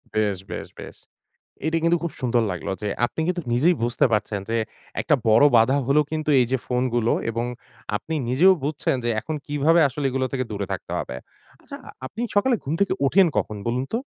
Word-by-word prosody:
বেশ, 105 -3 +1
বেশ, - - -5
বেশ। - - -9 0.7
এটা 160 +1 +1
কিন্তু 170 +1 +3
খুব 170 - -3
সুন্দর 120 -2 +2
লাগলো 90 - -5
যে 105 - -1 0.2
আপনি 160 - -6
কিন্তু 180 -1 -1
নিজেই 155 +9 +4
বুঝতে 120 +2 +2
পারছেন 105 -1 0
যে 115 - +1 0.4
একটা 155 - +2
বড় 110 +5 +6
বাধা 120 +5 +4
হলো 140 +3 +4
কিন্তু 155 -1 -2
এই 125 - +3
যে 130 - +2
ফোনগুলো, 125 -2 +1 0.2
এবং 115 +1 -2 0.5
আপনি 160 +9 -5
নিজেও 160 +10 +5
বুঝছেন 145 -2 0
যে - - 0
এখন 155 +8 -5
কিভাবে 150 +3 +3
আসলে 135 +1 -3
এগুলো 130 0 0
থেকে 130 -1 -1
দূরে 100 -2 -3
থাকতে - - -5
হবে। 65 - -5 0.5
আচ্ছা - - -9 0.3
আপনি 210 - -8 0.2
সকালে 245 +5 +4
ঘুম 145 +4 -2
থেকে 200 - +2
ওঠেন 190 +6 +5
কখন 105 - -2
বলুন 125 +2 0
তো? 230 - +1
130 Hz, 190 wpm, -23 LUFS, 115-160 Hz, 0.7 s, বড়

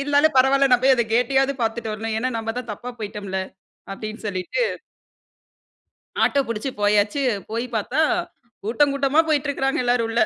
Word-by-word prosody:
இருந்தாலும் 290 +2 +3
பரவாயில்ல, 270 +1 +4
நான் 250 0 +4
போய் 270 - +6
அத 235 - +2
கேட்டையாவது 270 +3 +2
பார்த்துட்டு 225 -1 -2
வரணும். 220 +1 -3
ஏன்னா 255 +3 -1
நம்ம 225 0 -3
தான் 240 -3 -6
தப்பா 240 +4 -7
போயிட்டோம்ல 200 -2 -4 0.5
அப்டின்னு 215 +2 -7
சொல்லிட்டு 185 - -2 1.6
ஆட்டோ 280 - +3
புடிச்சு 230 +3 -3
போயாச்சு, 205 +6 +2 0.3
போய் 230 +2 -2
பார்த்தா 245 +8 0 0.6
கூட்டம் 275 +7 +2
கூட்டமா 280 +2 +2
போயிட்டு 300 -2 +1
இருக்கறாங்க 270 -1 0
எல்லாரும் 240 -1 +2
உள்ள. 230 - 0
240 Hz, 150 wpm, -22 LUFS, 215-275 Hz, 1.6 s, போய்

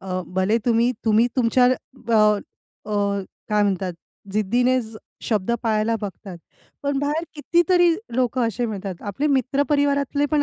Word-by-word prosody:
अ, 185 -1 -3
भले 190 +4 +2
तुम्ही 235 +1 +3
तुम्ही 220 +1 +4
तुमच्या 250 0 +3
अ, 250 -2 -2 0.8
अ, 200 -1 0 0.3
काय 210 -1 +2
म्हणतात, 190 -2 0 0.4
जिद्दीने 245 +5 +2 0.5
शब्द 215 -1 0
पाळायला 220 0 +1
बघतात, 195 -2 -7 0.4
पण 280 -1 0
बाहेर 295 +4 -1
कितीतरी 345 +3 +3 0.3
लोकं 250 -1 +1
असे 230 +2 -2
मिळतात. 200 -3 -5
आपले 210 +8 -2
मित्र 275 0 +1
परिवारातले 285 0 +1
पण 300 -1 +3
235 Hz, 130 wpm, -22 LUFS, 205-280 Hz, 0.8 s, तुम्ही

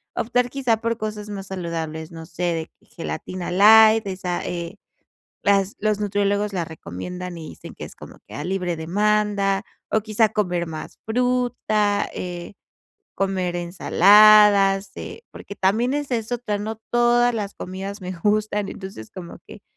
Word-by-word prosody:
optar 245 +1 0
quizá 250 -4 0
por 230 +1 -2
cosas 215 -1 -5
más 195 -2 -6
saludables, 165 -3 -5
no 165 -1 -9
sé, 165 +2 -7
de 165 -2 -1
que - - -29
gelatina 175 +2 -6
light, 220 +3 +7
esa, 185 -2 -3
eh, 170 -1 -5 0.7
las 200 -1 +2
los 215 0 0
nutriólogos 205 0 0
la 175 -2 -1
recomiendan 170 - -7
y 160 -2 -8
dicen - - -11
que - - -8
es - - -10
como - - -13
que - - -12
a - - -5
libre 180 -2 -1
demanda, 200 +3 +1 0.3
o 220 - +2
quizá 215 0 +1
comer 180 -5 -1
más 155 -1 -8
fruta, 235 -3 0
eh, 175 +2 -6 0.6
comer 190 -2 -1
ensaladas, 195 +2 +5
eh, - - -8
porque 200 - -10
también 225 +8 +1
esa 285 -4 -1
es 225 +1 -5
otra, 235 -4 -2
no 215 +2 -4
todas 240 0 +3
las 205 -3 -4
comidas 195 +3 -6
me 185 0 -5
gustan, 210 +2 0
entonces, 190 - -9
como 175 -2 -9
que, - - -12
200 Hz, 155 wpm, -22 LUFS, 180-215 Hz, 0.7 s, light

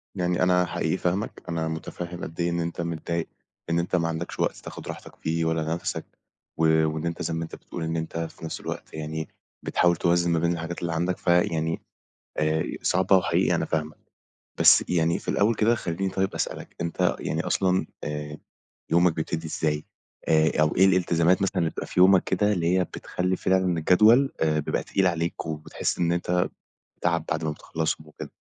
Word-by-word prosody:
يعني 90 -1 +1
أنا 90 0 +4
حقيقي - - -1
فاهمك، 95 +4 -2
أنا 80 -1 -1
متفهّم 85 +2 -5
قد 80 +2 -8
إيه 85 - +1
إن 85 0 -1
أنت 85 0 -3
متضايق 85 0 -3 0.4
إن 85 - +2
أنت 85 +2 -1
ما 85 -2 +1
عندكش 85 +1 -4
وقت - - +1
تاخد - - -9
راحتك - - -8
فيه 80 +1 -1
ولا 80 -1 0
نفَسك، 85 - -4 0.5
و 80 - +2 0.2
وإن 80 +1 -2
أنت 85 0 -3
زي 80 - -2
ما 80 - -2
أنت 80 - -7
بتقول 85 - -7
إن 80 +1 -2
أنت 80 +1 -4
في 80 0 -5
نفس 80 - -5
الوقت - - -6
يعني 80 0 -4 0.3
بتحاول 85 0 +3
توازن 85 +1 +2
ما 85 - +2
بين 85 +1 +1
الحاجات 85 0 -5
اللي 85 -1 -2
عندك، 85 +2 0
فيعني 80 -2 +1 0.6
آآ، 80 +1 +1 0.2
صعبة 95 +1 +4
وحقيقي 90 - +2
أنا - - 0
فاهمك. 80 -1 -2 0.6
بس - - +7
يعني 85 -1 +2
في - - -14
الأول 110 +3 +3
كده 110 +3 +3
خليني 95 -2 -2
طيب 95 0 -1
أسألك، - - -4
أنت 85 0 0
يعني - - -2
أصلًا 95 -1 +1 0.2
آآ، 75 0 -4 0.5
يومك 85 +1 +4
بيبتدي 80 0 -3
إزاي 75 -1 -1 0.4
آآ، 80 0 +4
أو 75 0 +2
إيه 95 +1 +6
الالتزامات 90 -1 +3
مثلًا 95 0 0
اللي 85 -2 +1
بتبقى - - -6
في - - -1
يومك 95 0 +6
كده 105 +3 +1
اللي 90 -1 +2
هي 90 - +2
بتخلّي 90 +1 -2
فعلًا 95 -2 +1
الجدول 110 - +5
آآ، 80 -1 +2
بيبقى 75 - -1
تقيل 95 -1 +1
عليك، 85 -2 -1
وبتحس 75 -1 -3
إن 85 -1 +2
أنت 90 +1 +1 0.5
تعب 85 -2 +1
بعد 80 +1 -1
ما 80 - 0
بتخلصّهم 80 +1 -3
وكده؟ 75 - -9
85 Hz, 190 wpm, -26 LUFS, 80-90 Hz, 0.6 s, بس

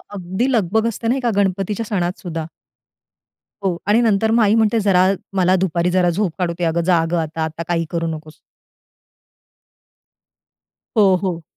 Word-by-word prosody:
अगदी 190 +8 -2
लगबग 220 -1 +1
असते 230 0 -4
ना 240 - +2
एका 245 -3 0
गणपतीच्या 200 +2 0
सणात 180 -4 -2
सुद्धा. 165 -3 -5 1.2
हो, 185 -3 0
आणि 215 +3 +4
नंतर 220 -1 +2
मग 230 0 +4
आई 210 +1 +3
म्हणते, 225 0 +2
"जरा 190 -3 +3 0.3
मला 185 0 +3
दुपारी 175 0 0
जरा 180 -1 +2
झोप 185 +1 0
काढू 175 -2 0
दे - - -2
अगं, 165 +1 +1
जा 165 -2 +3
गं 175 - +1
आता. 160 0 -4
आता 160 +1 -4
काही 165 -1 0
करू 165 -1 -2
नकोस." 155 -1 -7 2.6
हो, 195 -3 +5
हो. 175 -3 -2
185 Hz, 160 wpm, -19 LUFS, 170-210 Hz, 2.6 s, हो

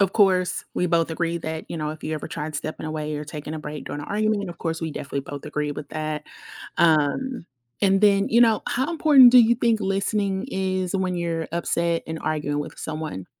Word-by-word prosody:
Of 195 -1 +3
course, 185 -4 +3
we 180 - +1
both 165 -1 +2
agree 170 +1 -1
that, 160 -1 -5
you - - -5
know, 155 -1 -2
if 155 0 -9
you 155 - -2
ever 150 - -5
tried 155 0 -5
stepping 155 +1 -5
away 155 -1 -3
or 150 - -5
taking 150 0 -7
a - - -4
break 150 -1 -7
during 145 - -5
an 145 - -8
argument, 210 -1 0
of 170 - -8
course 165 -1 -3
we 165 -1 -3
definitely 140 -1 -4
both 140 +1 -8
agree 150 -1 -2
with 145 0 -8
that. 155 -1 -3 0.5
Um, 165 - +2 0.4
and 195 -1 +4
then 200 -1 +4
you 235 - +5
know, 225 -2 +3
how 260 +5 0
important 295 -6 +7
do 255 - +9
you 235 0 +6
think 230 -2 +1
listening 195 0 0
is 185 -3 -2
when 185 -1 -1
you're 165 -2 -2
upset 170 0 0
and 160 0 -4
arguing 145 -2 -1
with 145 - -7
someone? 150 - -5
170 Hz, 215 wpm, -24 LUFS, 155-200 Hz, 0.5 s, do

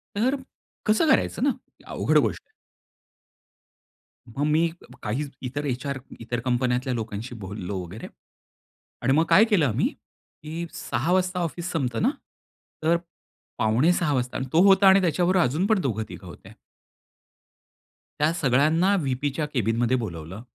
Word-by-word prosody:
तर, 245 +7 +2 0.5
कसं 220 +9 +3
करायचं - - +2
ना? 285 - +4 0.4
अवघड - - +1
गोष्ट - - +1
आहे. - - -38 1.9
मग 145 - 0
मी 155 +3 +3 0.4
काही 120 +8 -1
ज 145 - -7 0.2
इतर 145 +3 -4
एचआर 135 +1 -2 0.2
इतर 120 +1 -3
कंपन्यातल्या 125 +1 0
लोकांशी 115 +1 -5
बोललो 100 0 -5
वगैरे 90 +6 -8 0.9
आणि 130 +2 +2
मग 160 +3 +3
काय 215 - +7
केलं 205 -9 +3
आम्ही 110 - +1
की 160 +3 -10
6:00 130 +7 -2
वाजता 185 0 +1
ऑफिस 175 +1 -3
संपतं 135 -7 -1
ना, 240 - +4 0.7
तर 165 +2 +3 0.6
5:45 150 +9 +2
वाजता 125 -2 -1
अन् 130 - -3
तो 165 - +5
होता 195 0 +6
आणि 190 +1 +7
त्याच्याबरोबर 180 +1 +2
अजून 155 +10 0
पण 220 -2 +3
दोघं-तिघं 110 - -4
होत्या. 85 - -12 1.7
त्या 150 +2 +3
सगळ्यांना 160 +5 +3
व्हीपीच्या 140 +2 -1
कॅबिनमध्ये 120 +1 +1
बोलावलं. 85 +1 -7
145 Hz, 135 wpm, -25 LUFS, 120-175 Hz, 1.9 s, काय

